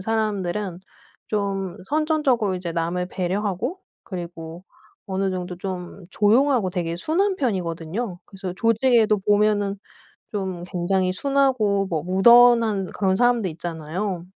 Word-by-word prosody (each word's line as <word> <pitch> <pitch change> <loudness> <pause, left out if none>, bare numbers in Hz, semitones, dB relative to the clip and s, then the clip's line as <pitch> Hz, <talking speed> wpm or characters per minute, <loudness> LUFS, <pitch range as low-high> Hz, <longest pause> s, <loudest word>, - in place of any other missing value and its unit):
사람들은 205 -3 -2 0.5
좀 195 -3 -2
선천적으로 290 - +1
이제 180 -2 -4
남을 170 +2 -1
배려하고 195 - -2 0.3
그리고 170 -2 -7 0.4
어느 195 0 -1
정도 180 -1 -4
좀 185 0 -6
조용하고 230 -1 +3
되게 170 -2 -2
순한 370 - +1
편이거든요. 185 - -3
그래서 190 -2 -7
조직에도 230 -2 +3
보면은 205 0 +1 0.5
좀 190 -4 -4
굉장히 185 +1 0
순하고 230 -4 +1
뭐 160 -3 -2
무던한 225 +2 +5
그런 190 -2 +2
사람들 240 -3 +2
있잖아요. 170 +3 -4
195 Hz, 290 characters per minute, -23 LUFS, 180-225 Hz, 0.5 s, 무던한